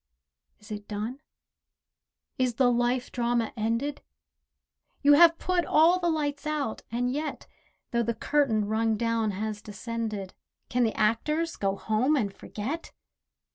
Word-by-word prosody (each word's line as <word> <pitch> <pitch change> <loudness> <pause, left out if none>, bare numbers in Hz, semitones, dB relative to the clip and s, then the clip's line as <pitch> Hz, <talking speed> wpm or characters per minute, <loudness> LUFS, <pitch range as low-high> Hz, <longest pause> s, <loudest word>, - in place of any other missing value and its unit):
Is 210 0 -15
it 210 -1 -6
done? 215 +6 -4 1.2
is 250 -2 +1
the 250 -1 +4
life 245 +1 0
drama 240 -2 0
ended? 230 +6 -1 1.0
You 290 +1 +7
have 330 +2 +7
put 365 -1 0
all 335 +4 +4
the 345 -1 +1
lights 295 -2 -1
out, 300 -7 -2
and 245 +2 0
yet, 300 +2 -4 0.5
Though 235 - +2
the 235 0 -1
curtain, 260 -8 +1
rung 220 +1 +1
down, 230 -1 0
has 210 +1 -3
descended, 215 -2 -5 0.4
Can 250 0 +2
the 225 - 0
actors 300 +10 +1
go 195 -1 0
home 220 +9 +1
and 205 -8 0
forget? 270 +11 -5
235 Hz, 135 wpm, -28 LUFS, 220-290 Hz, 1.2 s, You